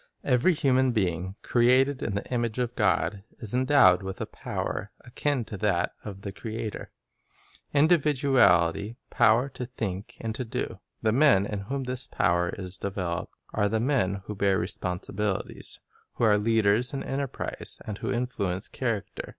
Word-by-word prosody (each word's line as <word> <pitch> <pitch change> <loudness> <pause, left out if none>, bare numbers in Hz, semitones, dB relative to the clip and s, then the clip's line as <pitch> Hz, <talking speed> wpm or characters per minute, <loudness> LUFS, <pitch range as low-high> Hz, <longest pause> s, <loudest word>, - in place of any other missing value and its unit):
Every 130 +9 +3
human 130 -3 +3
being, 95 -3 -1
created 130 +3 +3
in 100 - -2
the 100 - -2
image 120 -2 -1
of 125 -1 -1
God, 100 -1 +1
is 110 -2 -4
endowed 130 -8 +5
with 95 0 -6
a - - -2
power 100 - -4
akin 130 0 -1
to 105 - -7
that 95 -4 +1
of 100 -2 -8
the 100 - -5
Creator, 110 0 -5 0.4
— - - -28
individuality, 135 - +3 0.2
power 115 +5 +4
to 125 -2 -6
think 105 -5 -5
and 115 -1 -3
to 130 +2 -3
do. 115 - -4 0.2
The 110 - +3
men 125 -6 +5
in 105 -1 -3
whom 135 +7 -3
this 125 0 -3
power 85 0 +1
is 90 0 -5
developed 95 -4 -3 0.2
are 105 -1 +2
the 110 +1 +1
men 110 -7 0
who 105 - -5
bear 100 -1 +2
responsibilities, 95 +2 -2 0.4
who - - -2
are 105 -2 +5
leaders 110 +2 +3
in 135 - -3
enterprise, 135 -1 -4
and 105 -1 -5
who - - -2
influence 100 -7 -1
character. 115 -6 -3
110 Hz, 160 wpm, -27 LUFS, 95-125 Hz, 0.4 s, endowed